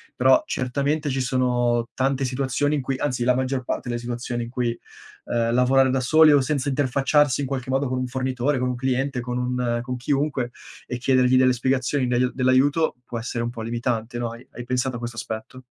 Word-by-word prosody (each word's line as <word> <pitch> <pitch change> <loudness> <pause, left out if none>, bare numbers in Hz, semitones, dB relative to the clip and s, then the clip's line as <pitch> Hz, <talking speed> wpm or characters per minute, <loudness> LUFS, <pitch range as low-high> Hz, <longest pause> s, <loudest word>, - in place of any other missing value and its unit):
però 130 +1 +4
certamente 140 +4 -1
ci 135 0 -1
sono 125 -2 +1
tante 135 0 0
situazioni 135 +3 0
in 145 - -1
cui, 135 +1 -2
anzi, 125 -4 -1
la 125 +1 +4
maggior 130 0 -1
parte - - -4
delle 120 0 -2
situazioni 120 0 -4
in 115 - -7
cui, 120 -2 -1 0.5
ehm, 115 -1 0
lavorare 130 +1 +4
da 130 0 +1
soli 155 +4 +6
o 145 - +5
senza 140 +1 -1
interfacciarsi 140 +1 +2
in 140 - -2
qualche 130 -1 -4
modo 135 +1 +1
con 130 0 -2
un 130 - -1
fornitore, 130 +1 -1
con 125 - 0
un 125 - -2
cliente, 130 +1 -1
con 125 0 -6
un 125 -1 -1
con 125 +1 -4
chiunque 135 -1 -1 0.3
e 125 - -4
chiedergli 130 0 +3
delle 130 0 +4
spiegazioni 130 +2 0
del 125 +1 +1
dell'aiuto 135 +5 +2
può 120 - -5
essere 115 0 -3
un 120 - -2
po' 120 -2 -7
limitante, 115 0 -2
no. 120 -1 -2
Hai 115 +2 -11
hai 125 - -8
pensato 125 0 -1
a - - -8
questo 120 -1 -6
aspetto? 110 +4 -6
130 Hz, 205 wpm, -23 LUFS, 120-135 Hz, 0.5 s, soli